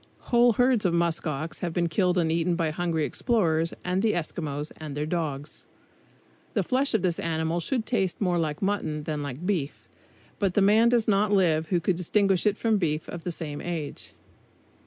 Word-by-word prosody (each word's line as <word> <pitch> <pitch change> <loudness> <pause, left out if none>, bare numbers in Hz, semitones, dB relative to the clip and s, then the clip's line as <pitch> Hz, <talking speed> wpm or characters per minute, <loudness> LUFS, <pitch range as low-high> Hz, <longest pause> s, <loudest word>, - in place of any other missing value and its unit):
Whole 240 -1 +5
herds 245 -1 +3
of 175 -3 +2
musk 170 0 0
ox 155 +2 -4
have 175 -3 -3
been 175 0 +1
killed 180 +2 +1
and 165 -2 +2
eaten 170 +1 +1
by 165 -3 0
hungry 165 -2 -1
explorers 165 -9 +1
and 180 +1 0
the 220 0 +2
Eskimos 155 -3 -3
and 150 -2 -7
their 150 - -1
dogs. 155 -3 -4 0.9
The - - +2
flesh 265 -1 +1
of 215 - +1
this 175 -2 0
animal 160 +1 -1
should 225 +7 -2
taste 195 -8 0
more 180 -4 +1
like 155 +1 -2
mutton 160 -7 -1
than 150 -1 -3 0.2
beef, 170 -8 -2 0.5
but 195 -3 0
the - - +4
man 220 +4 +5
does 235 -2 +2
not 205 0 +2
live 165 -5 +2
who 180 0 +1
could 175 +1 0
distinguish 195 +2 +2
it 205 0 +1
from 225 -2 +2
beef 155 -3 -1
of 170 -2 -7
the 175 - -1
same 150 -3 -5
age. 165 -4 -5
175 Hz, 190 wpm, -26 LUFS, 160-200 Hz, 0.9 s, Whole